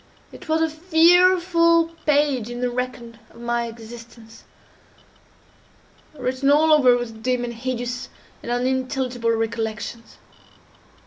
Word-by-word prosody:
It - - -13
was 320 +1 +2
a - - +2
fearful 335 0 +4 0.2
page 285 -6 +1
in 240 0 -6
the 250 0 -1
record 240 -2 -5 0.2
my 235 0 -2
existence, 230 0 -13 1.7
written 260 +1 -1
all 310 +2 +5
over 255 -5 +5
with 225 -2 -7
dim, 250 0 -1
and 240 -1 -4
hideous, 245 0 -4 0.3
and 240 - -6
unintelligible 255 -1 -1
recollections. 225 0 -3
250 Hz, 110 wpm, -22 LUFS, 235-300 Hz, 1.7 s, all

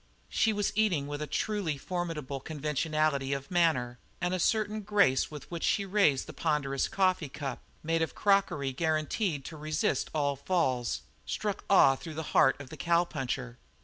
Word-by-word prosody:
She 225 - +2
was 205 -1 0
eating 195 -9 +2
with 145 +1 -5
a 150 - -3
truly 185 -1 -1
formidable 160 -4 -4
conventionality 150 -1 -1
of 140 +3 -5
manner, 130 -9 +2 0.2
and 180 +1 -1
a 185 - 0
certain 215 +3 +1
grace 200 -11 +3
with 150 +1 -10
which 170 -1 -4
she 200 - +2
raised 190 -9 +3
the 155 - -9
ponderous 140 -2 0
coffee 185 -6 +1
cup, 135 -2 -5 0.2
made 165 +1 +1
of 160 - -1
crockery 195 -9 +2
guaranteed 155 - -1
to 160 - -7
resist 155 0 -1
all 145 -2 0
falls, 130 -6 0 0.2
struck 210 -2 -3
awe 135 -8 +6
through 160 +3 -8
the 160 - -3
heart 135 - +5
of 140 -2 -10
the - - -8
cowpuncher. 135 -8 -1
155 Hz, 165 wpm, -30 LUFS, 140-185 Hz, 0.2 s, awe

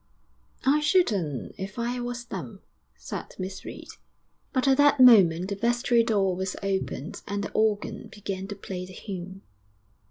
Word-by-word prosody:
'I 285 +3 +4
shouldn't 210 - +1
if 190 +3 -6
I 240 +1 -2
was 240 0 -4
them,' 170 - -7 0.3
said 65 +1 -7
Miss 190 +1 -6
Reed. - - -9 0.6
But 260 0 +1
at 265 -1 +5
that 290 -1 +5
moment 190 -8 +7
the 200 - -2
vestry 235 +2 +2
door 200 -5 +1
was 190 +1 -3
opened 190 -4 -3
and 200 0 -2
the - - -5
organ 215 -1 0
began 195 -2 -5
to 205 - -6
play 185 -2 -6
the 185 - -12
hymn. 190 0 -7
200 Hz, 155 wpm, -27 LUFS, 190-240 Hz, 0.6 s, moment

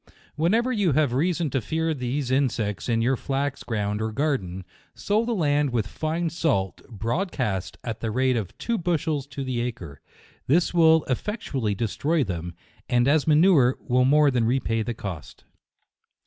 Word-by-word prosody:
Whenever 220 - +2
you 200 - +1
have 145 -3 +2
reason 165 +2 0
to 135 - 0
fear 160 +7 -1
these 130 0 -3
insects 120 -6 0
in 115 -1 +2
your 130 +3 +2
flax 135 +2 -2
ground 105 -2 -2
or 110 0 -2
garden, 105 - -2 0.3
sow 210 +2 0
the 240 - -2
land 145 -5 +2
with 120 -4 0
fine 160 - -2
salt, 150 - -1
broadcast, 115 - -2
at 115 -2 -4
the 115 - -3
rate 130 +3 +1
of 110 0 -4
two 235 -1 -2
bushels 160 -5 -1
to 140 0 -6
the 130 -2 -2
acre. 95 - -6 0.5
This 165 +7 +2
will 160 -2 +5
effectually 130 - -2
destroy 140 - 0
them, 85 -4 -5 0.3
and 120 +1 +3
as 150 +1 +3
a - - +3
manure, 150 -5 +5
will 125 0 +1
more 145 +1 +5
than 120 -3 +1
repay 115 -2 0
the 120 +1 -3
cost. 90 -8 -8
130 Hz, 165 wpm, -25 LUFS, 115-160 Hz, 0.5 s, will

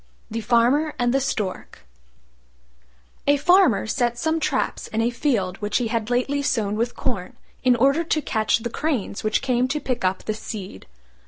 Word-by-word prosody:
THE 230 +1 -2
FARMER 250 +7 +2
AND 245 -1 +1
THE 270 - +2
STORK 200 - -4 1.4
A 285 0 +5
Farmer 355 - +4
set 240 +1 0
some 320 +5 0
traps - - -1
in 220 - -3
a 230 +1 +2
field 220 -8 0
which 210 0 0
he 240 -3 -1
had 225 -1 -2
lately 255 +4 0
sown 220 -7 0
with 235 +2 -1
corn, 195 -8 -3 0.3
in 250 -1 +5
order 275 +7 +3
to 315 -1 0
catch 215 -3 +1
the 235 +1 -5
cranes 265 -10 -2
which 215 +3 0
came 250 -1 +1
to 290 +4 -1
pick 255 -5 -3
up 185 +1 0
the 215 - -2
seed. 205 - -8
240 Hz, 175 wpm, -23 LUFS, 215-275 Hz, 1.4 s, A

